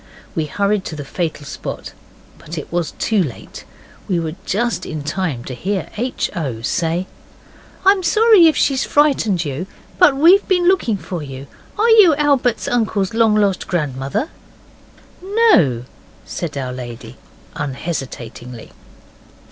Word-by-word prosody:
We 160 -4 -1
hurried 200 +5 0
to 155 - -5
the 145 -2 -6
fatal 155 0 -3
spot, - - -7 0.5
but 165 +2 -8
it 155 - -6
was 170 -2 -2
too 215 -3 +1
late. 140 -10 -6 0.4
We 180 -3 +1
were 160 -2 -3
just 210 -2 -1
in 155 -3 -5
time 155 -5 -2
to 130 - -7
hear 190 +9 -3
H. 245 +4 -2
O. 130 -10 -4
say 165 +6 -1 0.8
'I'm 390 0 +5
sorry 425 -1 +6
if 315 - +2
she 275 - +2
frightened 255 - +2
you. 145 +6 -4 0.3
But 275 -2 +6
we've 350 +7 +5
been 360 -2 +2
looking 355 - +2
for 180 -3 -6
you. 135 -1 -8 0.3
Are 435 +3 +3
you 415 -9 +7
Albert's 280 -5 +1
uncle's 215 -4 0
long 225 -2 +3
lost 200 -3 +1
grandmother?' 145 - -2 0.9
'NO,' 370 - +3 0.4
said 155 -5 -5
our 130 -2 -3
lady 120 -2 -8 0.4
unhesitatingly. 130 -5 -6
185 Hz, 140 wpm, -19 LUFS, -, 0.9 s, you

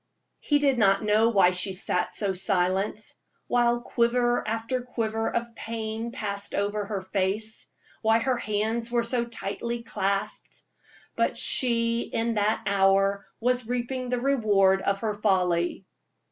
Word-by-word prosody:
He 290 - +2
did 275 -4 +2
not 195 -1 +3
know 215 +2 +3
why 195 -5 +4
she 185 +1 +2
sat 180 -1 +1
so 200 -2 -1
silent, 190 +2 0 0.5
while 240 0 +2
quiver 240 0 +1
after 230 +3 -2
quiver 225 -2 -2
of 235 0 -3
pain 225 0 -5
passed 200 -4 -4
over 205 +1 -1
her 200 -2 -4
face 195 +3 -1 0.3
why 220 0 +3
her 255 +2 0
hands 220 +2 -1
were 240 -1 +1
so 235 0 +1
tightly 235 +1 -5
clasped; 195 -3 -3 0.5
but - - 0
she 230 -2 +2
in 230 0 -2
that 210 0 0
hour 195 0 +2
was 250 0 0
reaping 250 +1 -3
the 250 0 0
reward 205 -8 +3
of 200 0 -1
her 220 -2 -1
folly. 185 -3 0
220 Hz, 140 wpm, -26 LUFS, 200-235 Hz, 0.5 s, why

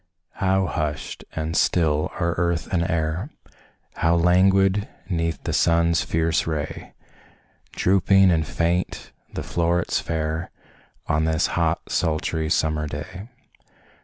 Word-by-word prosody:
How 95 0 +2
hushed 75 -5 -4
and 80 +1 -3
still 80 -3 +2
are 85 -2 +1
earth 85 -1 0
and 85 - +2
air, 85 - -1 0.7
How 85 +1 +2
languid 95 +4 +3 0.2
'neath 85 -2 -2
the - - -2
sun's 85 0 +3
fierce 80 -1 0
ray 75 -3 -4 0.8
Drooping 95 0 +4
and 80 -2 +1
faint 85 +3 -1 0.2
the - - -3
flowrets 85 0 0
fair, 80 +1 -3 0.6
On 80 +1 +1
this 80 -1 +1
hot, - - +1
sultry, 80 -1 0
summer 75 -1 +1
day! 75 +8 -7
85 Hz, 115 wpm, -23 LUFS, 80-90 Hz, 0.8 s, Drooping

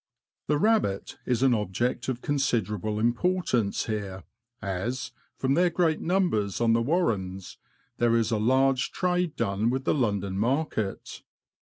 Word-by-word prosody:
The 150 - +2
rabbit 210 - +1
is 125 0 +1
an 130 -2 +5
object 110 +5 -1
of 125 -1 -3
considerable 110 -7 0
importance 120 - +1
here, 100 -4 -4 0.4
as, 105 +6 -3 0.3
from 135 0 +1
their 175 +4 +4
great 165 -2 +1
numbers 170 - 0
on 115 -1 +3
the 115 - +3
warrens, 105 - -1 0.4
there 120 -1 +3
is 115 0 +1
a 110 - +1
large 130 +3 +2
trade 180 -3 0
done 100 +3 0
with 130 +2 -1
the - - +2
London 100 -7 -1
market. 120 -4 -2
120 Hz, 140 wpm, -27 LUFS, 105-145 Hz, 0.4 s, an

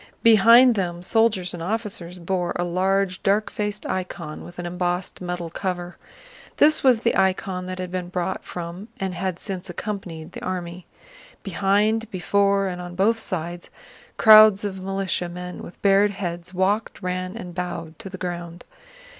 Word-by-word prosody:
Behind 230 +3 +7
them 175 -4 -3
soldiers 210 -4 +2
and 175 - -6
officers 190 -3 -4
bore 180 0 -2
a 175 - 0
large, 185 +1 0
dark 205 +2 +1
faced 210 0 -3
icon 175 -4 -4
with 175 - -12
an 175 - -5
embossed 180 +1 -2
metal 175 -2 -4
cover. 180 -1 -4 0.6
This 310 +1 +4
was 250 -4 +5
the 235 - +1
icon 185 -1 0
that 185 0 -5
had 185 -1 -5
been 180 -1 -3
brought 180 +1 -2
from 175 +3 -7
Smolénsk - - -34
and 190 -1 -1
had 180 0 -2
since 190 -1 -6
accompanied 175 -4 -6
the - - -9
army. 180 -1 -5 0.6
Behind, 205 +3 +1
before, 200 0 +2
and 180 -2 -4
on 175 0 -8
both 220 +5 +2
sides, 175 -3 -4 0.5
crowds 215 -2 +8
of 190 -2 -4
militiamen 180 -2 -3
with - - -11
bared 200 +1 +5
heads 175 -3 -5
walked, 195 +3 -1
ran, 185 +2 -3
and 180 -6 -7
bowed 175 -3 -5
to 195 - -7
the 190 - -8
ground. 175 -1 -6
185 Hz, 160 wpm, -23 LUFS, 175-200 Hz, 0.6 s, crowds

